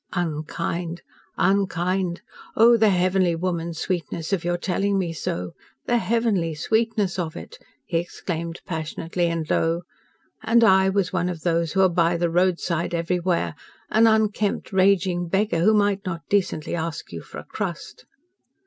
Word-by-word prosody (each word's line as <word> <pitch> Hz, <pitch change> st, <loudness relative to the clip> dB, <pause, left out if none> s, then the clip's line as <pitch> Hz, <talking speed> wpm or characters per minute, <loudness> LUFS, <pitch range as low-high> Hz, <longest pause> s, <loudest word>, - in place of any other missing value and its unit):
"Unkind! 170 Hz, +1 st, -3 dB, 0.3 s
Unkind! 185 Hz, -2 st, 0 dB, 0.3 s
Oh, 235 Hz, +2 st, +7 dB
the 220 Hz, -2 st, +4 dB
heavenly 185 Hz, -1 st, +2 dB
woman's 170 Hz, -1 st, -3 dB
sweetness 170 Hz, 0 st, -3 dB
of 185 Hz, -, 0 dB
your 175 Hz, 0 st, 0 dB
telling 195 Hz, +3 st, 0 dB
me 175 Hz, -3 st, -1 dB
so 90 Hz, -, -4 dB, 0.3 s
the 240 Hz, 0 st, +2 dB
heavenly 215 Hz, -9 st, 0 dB
sweetness 220 Hz, +1 st, 0 dB
of 160 Hz, -3 st, -3 dB
it!" 475 Hz, -, -10 dB, 0.3 s
he 170 Hz, -2 st, 0 dB
exclaimed 170 Hz, -1 st, -5 dB
passionately 165 Hz, +1 st, -2 dB
and 165 Hz, -2 st, -2 dB
low. 165 Hz, +2 st, +1 dB, 0.6 s
"And 235 Hz, +1 st, +4 dB
I 190 Hz, -3 st, +5 dB
was 190 Hz, -2 st, 0 dB
one 180 Hz, -1 st, 0 dB
of 170 Hz, -3 st, -5 dB
those 170 Hz, -2 st, 0 dB
who 190 Hz, -, +3 dB
are 190 Hz, -, +6 dB
'by 170 Hz, 0 st, +2 dB
the 170 Hz, 0 st, 0 dB
roadside 175 Hz, -1 st, +1 dB
everywhere,' 170 Hz, -, 0 dB, 0.4 s
an 225 Hz, +1 st, +5 dB
unkempt, 215 Hz, -2 st, +1 dB
raging 185 Hz, -2 st, +2 dB
beggar, 195 Hz, -1 st, +1 dB
who 215 Hz, +6 st, +4 dB
might 205 Hz, -1 st, +2 dB
not 170 Hz, -3 st, -5 dB
decently 190 Hz, -6 st, 0 dB
ask 165 Hz, -1 st, -4 dB
you -, -, -6 dB
for -, -, -11 dB
a -, -, -7 dB
crust." -, -, -6 dB
180 Hz, 150 wpm, -24 LUFS, 170-195 Hz, 0.6 s, Oh